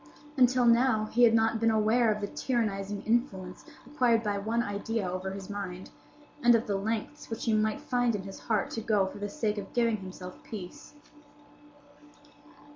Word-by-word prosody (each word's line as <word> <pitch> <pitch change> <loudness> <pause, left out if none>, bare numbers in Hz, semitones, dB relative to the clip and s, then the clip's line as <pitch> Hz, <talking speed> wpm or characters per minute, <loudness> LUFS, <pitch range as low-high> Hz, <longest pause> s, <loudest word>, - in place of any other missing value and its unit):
Until 255 -2 +4
now 235 -2 +4
he 240 - +1
had 230 -2 +7
not 225 0 +2
been 230 0 +3
aware 220 +1 +3
of 210 0 -2
the 205 - -2
tyrannizing 205 -5 -2
influence 205 -6 -1 0.2
acquired 245 -4 +2
by 205 -2 -1
one 225 +4 0
idea 205 0 -2
over 185 +1 -3
his 190 0 -7
mind, 190 -3 -6 0.5
and 240 -1 +6
of 230 - +1
the 200 - -1
lengths 220 +8 -3
which 225 - -4
he 225 - +2
might 215 0 +1
find 245 -2 +1
in 195 - -4
his 195 0 -9
heart 215 -3 -1
to 225 - -3
go 210 -3 +2
for 195 +2 -7
the 205 0 -3
sake 215 -7 -2
of 195 - -9
giving 230 -2 +2
himself 185 -1 -9
peace. 195 +4 -9
215 Hz, 180 wpm, -29 LUFS, 200-235 Hz, 0.5 s, had